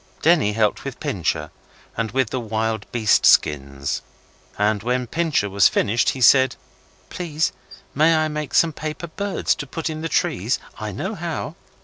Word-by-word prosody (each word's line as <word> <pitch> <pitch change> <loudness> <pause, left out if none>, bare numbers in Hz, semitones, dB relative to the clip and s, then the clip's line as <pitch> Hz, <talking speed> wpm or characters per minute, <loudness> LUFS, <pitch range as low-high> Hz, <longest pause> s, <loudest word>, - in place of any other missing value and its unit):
Denny 155 -10 +4
helped 105 -1 +1
with - - -7
Pincher, - - -2 0.4
and 115 -1 -2
with 130 -2 0
the 130 - -1
wild 110 -1 -3
beast 110 -4 +3
skins, 70 -1 +2 0.6
and 105 0 +1
when 125 +3 -1
Pincher 160 -5 0
was 100 0 +4
finished 115 +4 +1
he 130 - -3
said 130 +1 +6 0.6
'Please, 165 -3 -1 0.4
may 160 +3 +4
I 155 0 +2
make 150 -2 -4
some 165 -2 +4
paper 155 +3 -5
birds 200 +4 -1
to 145 - -7
put 160 +4 -4
in 155 0 -6
the 165 - -3
trees? - - 0 0.2
I - - -4
know - - -4
how. - - -4
130 Hz, 160 wpm, -22 LUFS, 110-155 Hz, 0.6 s, said